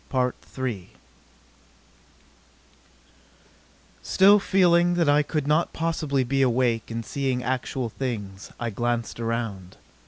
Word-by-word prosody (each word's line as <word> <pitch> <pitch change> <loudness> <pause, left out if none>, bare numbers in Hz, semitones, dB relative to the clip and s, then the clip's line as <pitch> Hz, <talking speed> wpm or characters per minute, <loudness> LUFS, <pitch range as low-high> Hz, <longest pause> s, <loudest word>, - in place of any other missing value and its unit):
Still 200 +2 +5
feeling 175 -3 +3
that 170 -3 +1
I 145 +1 +5
could 150 -1 -2
not 155 +3 +1
possibly 155 -5 -1
be 135 +2 0
awake 120 -3 +1
and 115 0 -5
seeing 130 -3 -2
actual 125 0 -2
things, 105 -6 -5
I 120 -1 -3
glanced 120 +2 -2
around. 115 -5 -4
130 Hz, 95 wpm, -25 LUFS, 115-155 Hz, -, Still